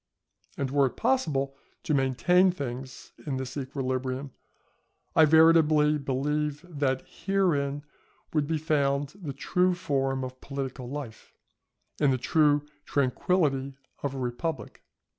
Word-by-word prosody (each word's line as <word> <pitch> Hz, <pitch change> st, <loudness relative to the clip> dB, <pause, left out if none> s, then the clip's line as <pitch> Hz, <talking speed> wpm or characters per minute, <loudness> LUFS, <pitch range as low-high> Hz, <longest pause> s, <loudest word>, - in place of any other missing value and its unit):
And 135 Hz, -2 st, -2 dB
were 140 Hz, -1 st, +4 dB
it -, -, -8 dB
possible 140 Hz, -, 0 dB, 0.3 s
to 155 Hz, -, -1 dB
maintain 145 Hz, +8 st, +3 dB
things 130 Hz, -6 st, -6 dB, 0.2 s
in 135 Hz, -2 st, -1 dB
this 130 Hz, 0 st, -5 dB
equilibrium, 130 Hz, -1 st, -3 dB, 0.8 s
I 160 Hz, -, +7 dB
veritably 155 Hz, -1 st, +5 dB
believe 145 Hz, +3 st, -1 dB
that 140 Hz, -5 st, -1 dB
herein 160 Hz, -7 st, 0 dB, 0.5 s
would 150 Hz, -2 st, +1 dB
be 160 Hz, 0 st, 0 dB
found 145 Hz, -3 st, +1 dB
the 155 Hz, -5 st, -4 dB
true 180 Hz, +6 st, +1 dB
form 135 Hz, -5 st, -1 dB
of 130 Hz, 0 st, -7 dB
political 135 Hz, -3 st, -5 dB
life, 135 Hz, -5 st, -8 dB, 0.6 s
and 145 Hz, -2 st, +4 dB
the 130 Hz, -, +1 dB
true 145 Hz, +2 st, +3 dB, 0.2 s
tranquility 140 Hz, 0 st, 0 dB, 0.2 s
of 140 Hz, -1 st, -3 dB
a -, -, -4 dB
republic. 125 Hz, 0 st, -4 dB
140 Hz, 120 wpm, -28 LUFS, 130-155 Hz, 0.8 s, I